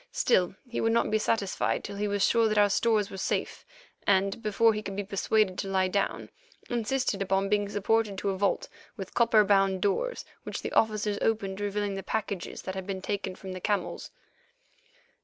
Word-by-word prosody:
Still, 185 -6 +2
he 240 - -3
would 225 0 +2
not 230 -2 +2
be 215 - +3
satisfied 205 -3 0
till 200 0 -6
he 210 +1 -1
was 200 -1 +2
sure 230 -1 +3
that 215 -1 0
our 205 -1 +5
stores 215 -2 +2
were 190 - -6
safe, - - -2 0.4
and, 195 +2 +2
before 215 +1 +3
he 210 - -3
could 195 -2 -6
be 205 - -2
persuaded 195 0 +1
to - - -2
lie 190 -1 +2
down, 200 +1 -1 0.4
insisted 240 -2 0
upon 195 0 +1
being 205 -1 +1
supported 205 0 +1
to 195 +1 -1
a - - -2
vault 205 - +1 0.3
with 195 -2 -7
copper 230 -2 +5
bound 195 -1 +3
doors, 205 - -1 0.2
which - - -6
the - - -3
officers 215 -2 +1
opened, 200 -3 0
revealing 205 0 -1
the 195 - -4
packages 200 -3 -4
that 190 - -4
had 190 0 -6
been 190 -1 -4
taken 195 -2 -3
from 190 0 -8
the 185 0 -6
camels. 205 0 -2
205 Hz, 195 wpm, -28 LUFS, 195-215 Hz, 0.4 s, our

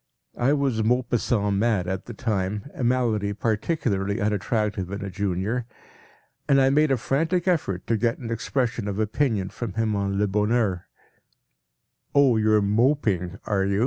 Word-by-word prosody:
I 130 +4 +3
was 135 -6 +1
Maupassant 115 -3 +1
mad 105 -4 +1
at 95 0 -3
the 120 - -7
time, 105 +1 -2
a 130 - -5
malady 115 -5 +1
particularly 105 - -1
unattractive 105 -2 -1
in 100 0 -4
a 100 - -5
Junior, 100 +5 -2 0.8
and 140 -1 +5
I 135 0 +4
made 150 +2 +3
a 135 - +2
frantic 165 +9 0
effort 150 - 0
to 115 - +1
get 115 +2 0
an 115 -2 -6
expression 115 -1 -1
of 100 -1 -3
opinion 110 -2 0
from 115 -6 -5
him 110 -1 0
on 100 -1 -1
“Le 105 - +2
Bonheur.” 105 -2 0 1.3
“Oh, 140 -4 +5
you’re 110 -1 +3
Moping, 105 - +1
are 100 -2 +1
you? 100 +1 0
110 Hz, 155 wpm, -24 LUFS, 100-125 Hz, 1.3 s, and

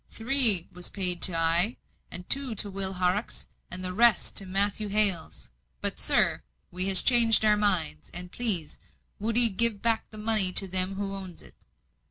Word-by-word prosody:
"Three 225 -7 +5
was 180 0 -7
paid 180 -3 0
to 180 - +4
I, 170 +7 +1 0.5
two 270 -4 -1
to 205 0 -3
Will 195 0 -1
Horrocks, 185 +4 -4 0.2
and 185 +1 -5
the 185 - -5
rest 235 +3 0
to 195 - +4
Matthew 200 +3 -2
Hales. 195 - -2 0.3
But, - - -4
sir, - - -1 0.3
we 185 +2 -1
has 190 -2 +2
changed 230 -3 +2
our 210 -1 +2
minds; 165 -8 -3
and 180 0 -11
please, 190 -11 -2 0.4
would 220 +2 -4
'ee 240 -1 +4
give 215 +1 +1
back 230 -1 -3
the 215 - -15
money 210 -4 +1
to 195 - +5
them 185 +1 +1
as - - -11
owns 195 -3 -9
it?" - - -17
195 Hz, 175 wpm, -24 LUFS, 180-220 Hz, 0.5 s, Three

